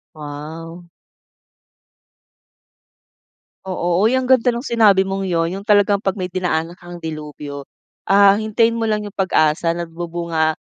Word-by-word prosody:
Wow! 160 +3 -9 2.8
Oo, 180 +1 +1
uy 240 - +2
ang 260 0 0
ganda 250 -2 +4
ng 235 - -4
sinabi 215 -7 +4
mong 195 0 -3
'yon. 165 -2 0
'Yong 200 +1 -8
talagang 205 -1 +4
'pag 195 -2 -1
may 185 -2 -4
dinaanan 175 -1 -2
kang 175 0 -11
delubyo, 150 -3 -7 0.4
ah, 200 +1 +5
hintayin 225 +1 +1
mo 225 - -1
lang 215 -1 0
'yong 205 -1 -8
pag-asa. 165 -3 +2
Nagbubunga 170 -1 -2
180 Hz, 130 wpm, -19 LUFS, 165-205 Hz, 2.8 s, ah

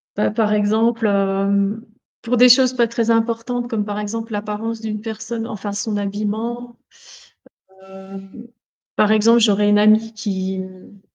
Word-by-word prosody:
Bah, 210 - 0
par 215 -1 0
exemple, 220 +2 +1
hem, 200 +1 0 0.4
pour 245 +1 -1
des 250 +1 +7
choses 255 +1 +5
pas 240 -2 +2
très 230 0 -1
importantes 230 +2 -1
comme, 220 -4 -2
par 205 0 -4
exemple, 225 +2 -5
l'apparence 210 +2 -4
d'une 215 -1 -5
personne, 225 +1 -5
enfin 205 -2 -6
son 205 +1 -3
habillement. 220 +4 -4 1.1
Hem, 195 +4 -12 0.5
par 210 0 +3
exemple, 225 +2 +4
j'aurais 205 -2 +3
une 205 0 +4
amie 215 +2 +3
qui, 190 -3 -4
mmh 185 +1 -12
215 Hz, 145 wpm, -19 LUFS, 205-230 Hz, 1.1 s, des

